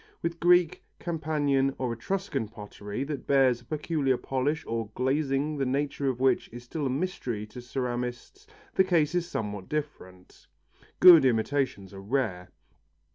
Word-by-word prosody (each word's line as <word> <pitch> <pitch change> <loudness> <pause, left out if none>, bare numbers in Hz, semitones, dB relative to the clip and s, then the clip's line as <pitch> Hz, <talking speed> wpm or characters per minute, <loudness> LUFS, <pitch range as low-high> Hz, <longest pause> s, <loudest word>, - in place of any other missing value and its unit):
With 170 0 -2
Greek, 175 0 +4 0.2
Campanian 145 -5 0
or 125 -3 -2
Etruscan 135 - -3
pottery 105 +1 -6
that 145 -1 -5
bears 130 -3 +3
a - - -20
peculiar 145 -2 0
polish 140 +6 -2
or 115 -2 -3
glazing 140 +2 0
the 135 - 0
nature 140 +1 -1
of 125 -2 -3
which 130 -1 +2
is 120 +1 -9
still 140 +3 -3
a - - -1
mystery 130 - -3
to 115 +4 -11
ceramists 125 - -4 0.3
the 190 - +4
case 165 -4 +2
is 175 -1 0
somewhat 105 - -4
different; 115 -12 -6 0.5
good 175 -5 +10
imitations 120 -4 0
are 95 - -9
rare. 100 -6 -2
135 Hz, 145 wpm, -28 LUFS, 120-155 Hz, 0.5 s, good